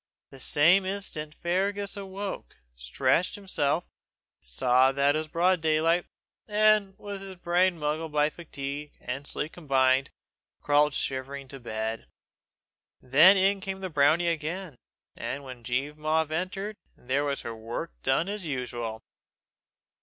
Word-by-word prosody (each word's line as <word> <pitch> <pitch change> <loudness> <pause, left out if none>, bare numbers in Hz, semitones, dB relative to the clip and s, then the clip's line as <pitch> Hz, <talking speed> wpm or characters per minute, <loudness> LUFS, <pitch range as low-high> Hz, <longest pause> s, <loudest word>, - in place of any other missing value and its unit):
The 135 - -12
same 170 +9 +5
instant 185 -6 -4
Fergus 195 +3 -1
woke, 195 - -6 0.2
stretched 130 - +1
himself, 170 -6 -1 0.6
saw 125 - +3
it 140 +2 +2
was 155 0 -1
broad 175 +2 +2
daylight, 165 +2 +2 0.4
and, 210 -2 +3
with 200 -1 -7
his 195 -1 -7
brain 175 +1 +2
muddled 155 +1 -2
by 150 0 +2
fatigue 145 -3 -6
and 135 +3 -5
sleep 150 - -1
combined, 135 -4 +2 0.5
crawled 145 0 +3
shivering 135 +1 -3
to 135 - -8
bed. 110 -1 -4 0.9
Then 155 +10 +7
in 195 +1 +2
came 190 0 -5
the 185 -2 -4
brownie 155 +4 +4
again; 165 0 -3 0.4
and 140 - -4
when 130 -3 -10
Jean 140 +5 -2
Mavor 155 0 +1
entered, 195 +5 -3 0.2
there 130 +3 -1
was 140 -1 -1
her 115 - -6
work 115 +9 -5
done 135 +6 +1
as 205 0 -4
usual. 120 -6 -4
155 Hz, 130 wpm, -28 LUFS, 135-185 Hz, 0.9 s, Then